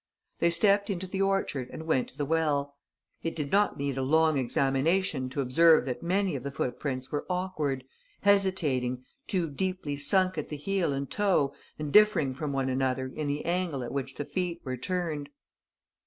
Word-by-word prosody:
They 170 - +4
stepped 200 +4 +3
into 190 -2 -2
the 190 +1 -3
orchard 195 -10 0
and 160 - -7
went 135 -6 +1
to - - -18
the 145 - -1
well. 145 -3 0 0.5
It 165 - -3
did 145 -3 -3
not 205 +1 +3
need 140 -1 -2
a - - 0
long 160 +3 +3
examination 135 +3 +1
to 135 +2 -2
observe 155 +4 +5
that 125 -2 -3
many 185 0 0
of 130 - -3
the 140 - -4
footprints 130 0 -3
were 145 - -3
awkward, 170 -8 -1 0.4
hesitating, 155 -11 +2 0.2
too 180 -4 0
deeply 180 -1 -2
sunk 185 +6 +2
at - - -5
the 150 - -4
heel 185 +1 0
and 140 0 -2
toe 185 -9 +1 0.2
and 150 -1 -4
differing 195 -11 +5
from 145 +2 -4
one 135 -1 0
another 130 0 -1
in 155 -1 -2
the 145 +1 -2
angle 170 -6 -1
at 120 - -5
which 135 -1 -3
the 145 - -4
feet 175 -1 -2
were 130 -1 -2
turned. 155 0 -3
150 Hz, 185 wpm, -29 LUFS, 135-185 Hz, 0.5 s, observe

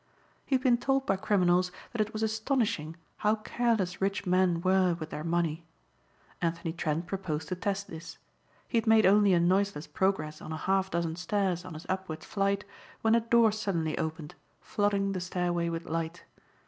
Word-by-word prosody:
He 270 - +2
had 260 - 0
been 245 -3 +4
told 270 +1 +1
by 195 - +2
criminals 180 -2 +2 0.2
that 235 - -1
it 215 +1 -1
was 220 0 -3
astonishing 220 - 0 0.2
how 215 +1 +2
careless 215 -4 -1
rich 195 0 0
men 180 -1 +3
were 185 -1 +3
with 155 0 -6
their 150 - -5
money. 165 -1 0 0.8
Anthony 165 -1 -1
Trent 160 0 -2
proposed 160 -5 -4
to 185 - -1
test 200 +2 -2
this. 160 +1 -9 0.5
He 235 - +2
had 225 - -6
made 220 -1 +6
only 205 +1 +5
a 175 - +4
noiseless 185 -2 +1
progress 190 -6 -1
on - - -7
a 160 - -3
half 190 +3 +1
dozen 170 -1 -2
stairs 180 0 0
on 180 -3 -8
his 155 - -9
upward 185 -4 -3
flight 200 0 0 0.4
when 220 0 +4
a 235 - +6
door 230 -1 +4
suddenly 190 -7 -1
opened, 160 -1 -4 0.3
flooding 200 -2 0
the 185 -2 -3
stairway 175 -1 -1
with 165 0 -4
light. 165 +1 -3
185 Hz, 180 wpm, -29 LUFS, 170-210 Hz, 0.8 s, made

